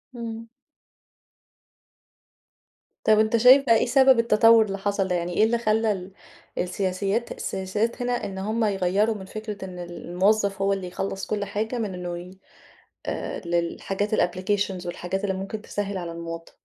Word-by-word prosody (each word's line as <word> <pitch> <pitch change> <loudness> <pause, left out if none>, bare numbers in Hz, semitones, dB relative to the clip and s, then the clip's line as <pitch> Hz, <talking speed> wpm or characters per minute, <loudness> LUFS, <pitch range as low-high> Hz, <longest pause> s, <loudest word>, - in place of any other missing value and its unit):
إمم. 230 -1 -6 2.5
طَب 215 0 +5
أنت 220 +1 +3
شايف 255 +4 +7
بَقى 230 - +5
إيه - - +1
سبب 265 0 +5
التطور 225 0 +6
اللي 195 -1 -4
حصل 200 -1 -1
ده؟ 180 - 0
يعني 175 0 -2
إيه 215 - +3
اللي 235 +2 +3
خلّى 220 -1 +1
ال 190 -1 -5 0.5
السياسيات 195 +5 -1
السياسات 210 +6 -2
هنا 245 0 -1
إن 190 -1 -6
هُم 215 +3 0
يغيّروا 200 +2 +1
من 190 -2 -8
فكرة 210 -1 -6
إن 180 -1 -8
ال 175 0 -8
الموظف 195 +2 +2
هو 195 0 +2
اللي 190 -2 -4
يخلّص 195 +1 -4
كل 205 -1 -1
حاجة 220 +4 -3
من 210 -5 -2
إنه 175 -1 -5
ي 180 +1 -9 0.7
آآ - - -3
للحاجات 190 +5 -1
الapplications 185 0 0
والحاجات 180 +3 -4
اللي 195 -1 0
ممكن 195 +3 -5
تسهِّل 200 -2 -4
على 170 -2 -5
المواطن؟ 165 0 -7
200 Hz, 160 wpm, -25 LUFS, 185-220 Hz, 2.5 s, شايف